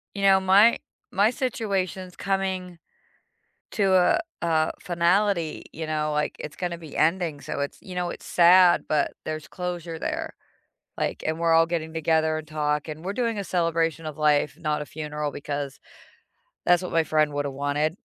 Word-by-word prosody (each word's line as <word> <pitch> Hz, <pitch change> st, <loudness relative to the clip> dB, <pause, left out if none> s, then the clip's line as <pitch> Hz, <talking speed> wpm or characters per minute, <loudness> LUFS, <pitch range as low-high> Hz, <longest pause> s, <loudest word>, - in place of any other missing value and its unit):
You 200 Hz, -, -3 dB
know, 195 Hz, -1 st, +6 dB
my 200 Hz, +5 st, +5 dB, 0.3 s
my 200 Hz, +3 st, +4 dB
situation's 195 Hz, -, -2 dB
coming 190 Hz, -3 st, -2 dB, 0.9 s
to 195 Hz, -3 st, +2 dB
a 185 Hz, -, +4 dB, 0.2 s
a 160 Hz, -2 st, +1 dB
finality, 175 Hz, 0 st, +1 dB
you 160 Hz, +1 st, -5 dB
know, 155 Hz, -1 st, -1 dB
like 150 Hz, 0 st, -1 dB
it's 150 Hz, -, -7 dB
gonna 175 Hz, -2 st, -3 dB
be 160 Hz, -3 st, -10 dB
ending, 165 Hz, -2 st, +1 dB
so 140 Hz, -, -5 dB
it's 140 Hz, -, -3 dB
you 185 Hz, -, -9 dB
know, 175 Hz, -1 st, -1 dB
it's -, -, -9 dB
sad, 175 Hz, 0 st, +6 dB
but 150 Hz, -1 st, +1 dB
there's 155 Hz, -1 st, -5 dB
closure 175 Hz, -2 st, -5 dB
there, -, -, -3 dB, 0.6 s
like -, -, -2 dB
and 160 Hz, +1 st, -1 dB
we're 165 Hz, 0 st, +2 dB
all 165 Hz, 0 st, +5 dB
getting 160 Hz, -1 st, -3 dB
together 160 Hz, 0 st, +1 dB
and 155 Hz, -, -8 dB
talk 150 Hz, 0 st, -1 dB
and 155 Hz, +2 st, -7 dB
we're 195 Hz, -, -2 dB
doing 230 Hz, -1 st, -1 dB
a 200 Hz, -, -3 dB
celebration 165 Hz, -3 st, 0 dB
of 155 Hz, -1 st, -6 dB
life, 150 Hz, -1 st, +2 dB
not 150 Hz, -3 st, -1 dB
a -, -, -7 dB
funeral 150 Hz, -1 st, -4 dB
because 145 Hz, -1 st, -5 dB, 0.9 s
that's 175 Hz, 0 st, +4 dB
what 180 Hz, -, -5 dB
my 165 Hz, -1 st, +3 dB
friend 155 Hz, -1 st, +1 dB
woulda 145 Hz, -1 st, -2 dB
wanted. 145 Hz, +4 st, -1 dB
165 Hz, 170 wpm, -25 LUFS, 155-185 Hz, 0.9 s, know